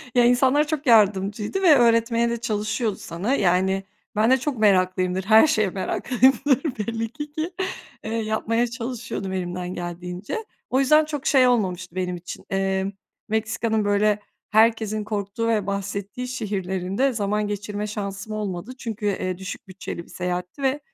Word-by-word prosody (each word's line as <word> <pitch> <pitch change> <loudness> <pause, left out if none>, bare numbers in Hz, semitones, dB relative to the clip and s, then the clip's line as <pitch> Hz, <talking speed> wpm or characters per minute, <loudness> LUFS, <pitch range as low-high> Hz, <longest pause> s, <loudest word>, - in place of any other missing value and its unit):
Ya, 245 -1 +6
insanlar 265 +5 +4
çok 310 -1 -2
yardımcıydı 210 - +3
ve 330 -5 +7
öğretmeye 230 -1 +3
de 235 - -1
çalışıyordu 215 0 -1
sana. 185 +10 -3
Yani 190 -2 +2 0.3
ben 220 +4 +3
de 260 - +6
çok 265 -1 -3
meraklıyımdır. 185 -2 +2
Her 220 +8 +6
şeye 215 -9 +2
meraklıyımdır 260 +7 +2
belli 225 +1 -2
ki, 295 +1 -7
ki, 315 +3 -3 0.5
eee, 220 - -5
yapmaya 225 +1 0
çalışıyordum 230 -5 -5
elimden 180 0 -3
geldiğince. 180 - -5 0.2
O 260 - +2
yüzden 305 +3 +5
çok 295 -3 -5
şey 260 -3 +5
olmamıştı 185 -7 0
benim 180 -1 -1
için, 175 0 -9
eee, 195 0 0 0.4
Meksika'nın, 220 0 0
böyle, 205 +1 +2 0.3
herkesin 220 -1 +3
korktuğu 210 +1 -3
ve 215 -4 +1
bahsettiği 200 +4 -3
şehirlerinde 200 0 -1
zaman 210 -1 0
geçirme 205 +1 -4
şansım 200 0 -5
olmadı. 205 +1 -4
Çünkü, 225 -4 -5
eee, 185 -3 -1
düşük 190 +3 -7
bütçeli 185 -2 -7
bir - - -21
seyahatti 180 +7 -4
ve 270 +2 +1
215 Hz, 145 wpm, -24 LUFS, 190-240 Hz, 0.5 s, ve